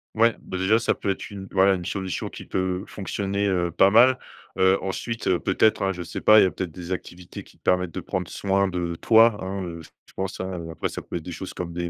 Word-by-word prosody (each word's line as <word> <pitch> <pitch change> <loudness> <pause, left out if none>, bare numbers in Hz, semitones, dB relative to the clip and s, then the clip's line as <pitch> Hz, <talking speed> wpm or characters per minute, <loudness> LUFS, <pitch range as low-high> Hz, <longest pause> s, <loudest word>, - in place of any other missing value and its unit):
Ouais, 115 +1 +4
bah, 95 - -6
déjà, 95 +4 +3
ça - - +1
peut 100 - -4
être 95 - -3
une 95 -1 -8
voilà 95 0 +4
une 90 -2 -4
solution 95 -1 -3
qui - - -9
peut 95 0 -2
fonctionner, 100 0 -2
heu, 90 -3 0
pas 95 +4 +5
mal. 125 +4 +6 0.4
Heu, 95 +1 +4
ensuite, 115 +4 -4
heu, 90 -2 +3
peut-être, 110 - +2
hein, 95 0 +1
je 90 -1 -6
sais 85 - -6
pas, 110 0 +7
il - - +6
y - - +5
a 95 - 0
peut-être 95 - -4
des 90 +2 -8
activités 90 -1 -7
qui - - -20
te - - -42
permettent 90 -2 +1
de - - -4
prendre 90 -2 -3
soin 100 0 +1
de 90 -2 -3
toi, 115 +4 +5
hein, 95 +1 -4
heu. 85 -2 -6
Je - - -14 0.2
je - - -33
pense, 95 -1 -4
hein, 95 -1 -4
heu, - - -7
après 80 - -3
ça - - -6
peut - - -8
être 85 - -3
des 90 - -7
choses 95 +2 -7
comme 90 -1 -5
des 85 0 -3
95 Hz, 265 wpm, -24 LUFS, 90-100 Hz, 0.4 s, pas